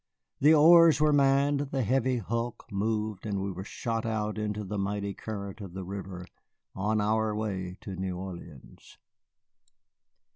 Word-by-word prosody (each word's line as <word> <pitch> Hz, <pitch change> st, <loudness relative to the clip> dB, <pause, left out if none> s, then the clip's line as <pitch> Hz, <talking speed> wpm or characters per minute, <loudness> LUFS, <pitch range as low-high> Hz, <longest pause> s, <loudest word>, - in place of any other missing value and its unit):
The 150 Hz, +3 st, +6 dB
oars 165 Hz, +1 st, +7 dB
were 150 Hz, 0 st, +4 dB
manned, 140 Hz, 0 st, +3 dB
the 135 Hz, -2 st, -1 dB
heavy 130 Hz, +2 st, +1 dB
hulk 115 Hz, +2 st, -3 dB
moved, 105 Hz, 0 st, -2 dB
and 100 Hz, -3 st, -2 dB
we 95 Hz, 0 st, -2 dB
were 95 Hz, +1 st, -6 dB
shot 115 Hz, +2 st, -3 dB
out 110 Hz, -1 st, -2 dB
into 105 Hz, 0 st, -2 dB
the 100 Hz, +1 st, -4 dB
mighty 100 Hz, 0 st, -2 dB
current 100 Hz, -1 st, -7 dB
of 95 Hz, -3 st, -9 dB
the 95 Hz, -, -4 dB
river 95 Hz, -1 st, -7 dB, 0.5 s
on 105 Hz, +3 st, 0 dB
our 110 Hz, +1 st, +1 dB
way 95 Hz, -4 st, -3 dB
to 95 Hz, -, -6 dB
New 95 Hz, -1 st, -3 dB
Orleans. 90 Hz, -1 st, -10 dB
105 Hz, 150 wpm, -29 LUFS, 95-120 Hz, 0.5 s, oars